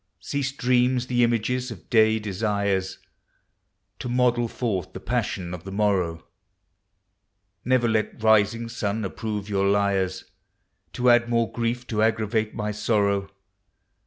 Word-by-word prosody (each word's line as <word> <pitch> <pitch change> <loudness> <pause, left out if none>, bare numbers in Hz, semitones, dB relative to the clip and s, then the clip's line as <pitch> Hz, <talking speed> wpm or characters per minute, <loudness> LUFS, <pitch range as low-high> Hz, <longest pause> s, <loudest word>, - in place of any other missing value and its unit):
Cease 135 +6 -2
dreams, 125 -1 +1
the 120 -1 +2
images 120 +2 0
of 110 -7 -10
day 110 -2 +4
desires, 100 -2 -1 1.0
To 125 - -5
model 120 -1 +2
forth 110 -7 -3
the - - -6
passion 90 -1 -2
of 90 -1 -7
the 95 - -8
morrow; 95 -5 0 1.4
Never 125 -1 +2
let 110 0 -1
rising 110 +1 +3
sun 110 -2 -2
approve 105 +1 -4
you 100 -2 0
liars, 100 -2 +1 0.7
To 125 0 +3
add 120 0 +3
more 115 -1 +1
grief 120 +1 -2
to 110 -3 -1
aggravate 110 0 0
my 105 0 -2
sorrow. 100 -2 0
110 Hz, 130 wpm, -25 LUFS, 100-120 Hz, 1.4 s, day